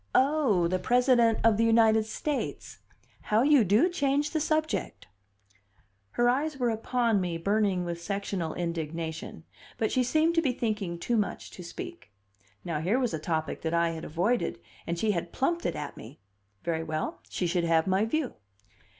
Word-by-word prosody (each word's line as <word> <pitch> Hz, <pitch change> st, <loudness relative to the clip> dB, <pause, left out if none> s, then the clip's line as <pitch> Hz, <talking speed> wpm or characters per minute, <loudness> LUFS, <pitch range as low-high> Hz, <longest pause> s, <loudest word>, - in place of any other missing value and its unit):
"Oh, 260 Hz, -, +3 dB
the 185 Hz, +2 st, 0 dB
President 240 Hz, +2 st, +3 dB
of 225 Hz, -2 st, +4 dB
the 230 Hz, -, +3 dB
United 225 Hz, -1 st, +4 dB
States! 285 Hz, +5 st, -4 dB, 0.5 s
How 215 Hz, +3 st, +3 dB
you 285 Hz, -3 st, +5 dB
do 210 Hz, -, +4 dB
change 290 Hz, -4 st, 0 dB
the 315 Hz, -, 0 dB
subject!" 310 Hz, +1 st, -1 dB, 1.1 s
Her 240 Hz, -, +2 dB
eyes 280 Hz, +4 st, +1 dB
were 245 Hz, -3 st, +1 dB
upon 225 Hz, -1 st, +1 dB
me, 175 Hz, -2 st, -2 dB
burning 195 Hz, 0 st, +1 dB
with 170 Hz, -1 st, -4 dB
sectional 195 Hz, -3 st, -3 dB
indignation, 165 Hz, -, -4 dB, 0.3 s
but 220 Hz, -, 0 dB
she 255 Hz, -, +2 dB
seemed 315 Hz, +6 st, +2 dB
to 330 Hz, -, +3 dB
be 270 Hz, -6 st, +1 dB
thinking 210 Hz, -7 st, -2 dB
too 235 Hz, +7 st, -1 dB
much 210 Hz, -, -2 dB
to 180 Hz, -, -10 dB
speak. 350 Hz, -, -8 dB, 0.5 s
Now, 165 Hz, -4 st, -2 dB
here 185 Hz, +10 st, +1 dB
was 250 Hz, -7 st, 0 dB
a 160 Hz, -, -2 dB
topic 160 Hz, 0 st, -2 dB
that 165 Hz, +1 st, -1 dB
I 170 Hz, 0 st, +2 dB
had 160 Hz, 0 st, -6 dB
avoided, 180 Hz, +10 st, 0 dB, 0.3 s
and 170 Hz, -, -2 dB
she 215 Hz, +4 st, +1 dB
had 170 Hz, -3 st, -3 dB
plumped 340 Hz, +5 st, 0 dB
it -, -, -2 dB
at 150 Hz, -, -5 dB
me. 125 Hz, +8 st, -12 dB, 0.4 s
Very 165 Hz, -1 st, -1 dB
well; 155 Hz, -1 st, -3 dB
she 180 Hz, -, -2 dB
should 175 Hz, 0 st, 0 dB
have 165 Hz, -1 st, +3 dB
my 190 Hz, +2 st, +2 dB
view. 275 Hz, +3 st, -1 dB
215 Hz, 175 wpm, -28 LUFS, 170-255 Hz, 1.1 s, you